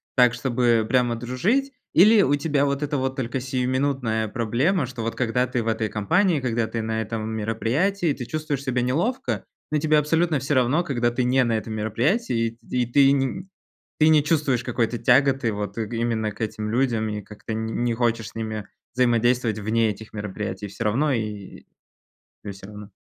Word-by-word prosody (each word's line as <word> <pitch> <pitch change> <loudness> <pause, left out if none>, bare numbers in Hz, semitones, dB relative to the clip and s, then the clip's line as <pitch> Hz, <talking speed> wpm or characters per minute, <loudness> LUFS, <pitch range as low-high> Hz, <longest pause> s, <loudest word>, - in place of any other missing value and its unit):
так, 125 -2 +5
чтобы 120 -2 +1
прямо 125 -2 +2
дружить? 175 - 0 0.2
Или 210 +5 +7
у 145 -6 +3
тебя 145 -1 +1
вот 140 +1 -1
эта 145 -1 -1
вот 130 0 -1
только 130 0 -2
сиюминутная 130 -3 -1
проблема, 125 - 0
что 125 -1 -7
вот 115 - -3
когда 125 +1 0
ты 125 -1 -2
в 115 - -6
этой 110 -1 0
компании, 145 - +1
когда 115 -2 0
ты 115 - -3
на 110 0 -2
этом 110 0 -4
мероприятии, 125 - 0
ты 125 - -6
чувствуешь 150 -1 -3
себя 125 -2 0
неловко; 180 - -1 0.3
но 155 - +2
тебе 155 0 +3
абсолютно 160 +1 +2
всё 140 +3 -2
равно, 130 +7 +2
когда 120 -7 0
ты 125 +1 -1
не 130 +1 +3
на 115 -2 +1
этом 110 0 -5
мероприятии, 115 - 0
и 125 -1 +1
т - - -17
ты 140 -1 +6
не, 140 +7 -1 0.5
ты 155 - +5
не 150 -2 +5
чувствуешь 150 -6 +1
какой-то 120 -1 -1
тяготы 135 -1 +3
вот 105 0 -5
именно 115 -1 -1
к 105 - -12
этим 105 0 -3
людям 115 -2 0
и 105 0 -4
как-то 105 +1 -8
н 110 0 -2 0.2
не 120 -1 +1
хочешь 115 -2 0
с - - -22
ними 110 -2 -4 0.3
взаимодействовать 120 -2 +2
вне 110 +2 +1
этих 110 +2 -11
мероприятий, 105 -1 -5
всё 100 - -6
равно? 135 +8 +2
И 105 -4 -5 0.8
тебе 100 - -6
всё 95 0 -12
равно. 105 0 -10
120 Hz, 185 wpm, -24 LUFS, 110-140 Hz, 0.8 s, Или